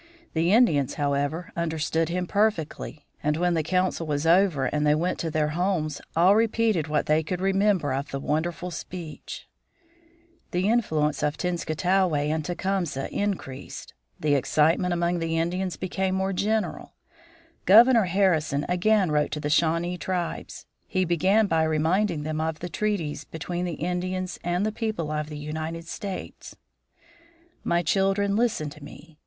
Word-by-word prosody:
The 165 +2 +2
Indians, 180 - +3
however, 145 +3 -1
understood 160 -1 -1
him 180 +1 -1
perfectly, 170 -7 -1 0.2
and 150 +1 0
when 175 +1 +1
the 165 - +1
council 180 0 0
was 145 0 -1
over 170 -5 +4
and 150 +3 0
they 150 0 +4
went 175 +4 -1
to 165 - -2
their 150 -1 0
homes 160 -3 -1
all 180 +5 +5
repeated 220 -6 +2
what 150 0 0
they 155 +1 +3
could 175 +3 -4
remember 195 -5 +2
of 140 +1 -3
the 135 - -4
wonderful 165 +5 -2
speech. 165 0 -8 1.0
The 180 +2 0
influence 155 -11 +1
of 150 0 0
Tenskwatawa 180 0 0
and 150 +2 0
Tecumseh 175 -4 -2
increased. 180 -10 -4 0.3
The 150 -1 +1
excitement 155 +6 +2
among 175 0 0
the 165 0 -1
Indians 180 +2 -1
became 185 0 -1
more 190 +1 0
general. 215 +3 -1 0.7
Governor 230 +2 +7
Harrison 170 -6 +1
again 185 0 +2
wrote 150 0 +2
to 150 - -2
the 150 0 -2
Shawnee 170 +3 +1
tribes. 180 0 -4 0.2
He 185 -1 0
began 185 +6 +3
by 165 -4 +1
reminding 160 +2 +1
them 155 +1 -2
of 160 -1 -2
the 175 +3 -6
treaties 180 -4 -2
between 175 +3 -4
the 175 - -3
Indians 180 +2 -3
and 175 +3 0
the 215 - 0
people 215 -9 -3
of 150 0 -2
the 150 - -6
United 160 +2 -5
States: 195 +1 -7 1.1
"My 170 0 +1
children, 195 +3 +1
listen 210 -10 0
to 150 0 -13
me. 150 +1 -13
170 Hz, 150 wpm, -26 LUFS, 155-190 Hz, 1.1 s, Governor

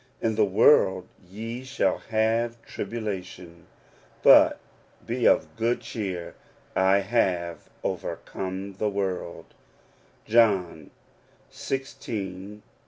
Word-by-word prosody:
In 115 - 0
the 105 0 +3
world 95 -2 +4 0.2
ye 115 +5 -6
shall 130 +1 0
have 115 +1 0
tribulation 95 -5 -6 0.6
but - - +7 0.5
be 120 +1 +1
of - - +2
good 115 +1 0
cheer; 95 -6 -5 0.4
I 95 +1 +4
have 95 -5 -1
overcome 95 +1 -4
the 105 - +1
world' 95 -4 -4 0.7
(John 100 -9 +2 0.6
xvi. 105 -7 -5
100 Hz, 90 wpm, -26 LUFS, 95-115 Hz, 0.7 s, but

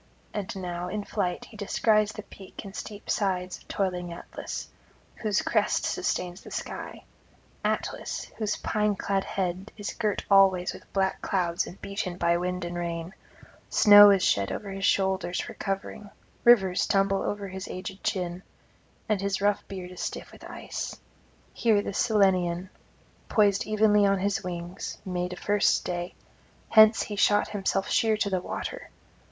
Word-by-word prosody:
And 200 -2 -4
now 180 -2 -4
in 205 +3 -3
flight 185 -4 -2
he - - -15
descries 215 +1 +2
the 215 - -8
peak 195 0 -11
and 195 0 -9
steep 205 -1 -8
sides 185 -3 -1
of - - -22
toiling 180 -3 -2
Atlas, 170 - -7 0.5
whose 210 -2 0
crest - - +1
sustains 180 +2 -2
the - - -11
sky; - - -6 0.6
Atlas, - - -2 0.2
whose 210 -1 -1
pine 210 -1 0
clad 195 0 -1
head 190 +2 -3
is 205 -1 -4
girt 215 -3 -1
alway 190 -2 +6
with - - -14
black 190 -1 0
clouds 175 -3 0
and 180 - -10
beaten 200 -3 -4
by 170 -1 +2
wind 180 +1 -2
and 175 0 -4
rain; 170 +1 -4 0.6
snow 205 -1 +9
is 195 -2 +4
shed 100 -1 +2
over 200 -2 -5
his 195 0 -1
shoulders 190 -2 +1
for - - -5
covering; 195 +1 -4 0.4
rivers 195 -7 +5
tumble 195 -2 +2
over 205 -1 -3
his 190 0 -6
aged 190 +1 -7
chin; 180 -4 -2 0.7
and 210 -3 +1
his 200 -1 -1
rough 205 0 +2
beard 185 -2 -7
is 180 - -8
stiff - - -5
with - - -15
ice. - - -6 0.5
Here 215 -3 +2
the - - -4
Cyllenian, 185 -4 +2 0.6
poised 205 -2 +3
evenly 210 -1 +4
on 195 0 +3
his 200 +2 -1
wings, 175 0 -5
made 180 -1 -2
a - - -6
first 205 +2 +2
stay; 175 0 -4 0.5
hence 220 0 +7
he 210 - -5
shot 205 +1 +3
himself 195 -1 -1
sheer 220 -1 +2
to 200 -1 -1
the 185 -1 0
water. - - -5
195 Hz, 160 wpm, -27 LUFS, 180-205 Hz, 0.7 s, snow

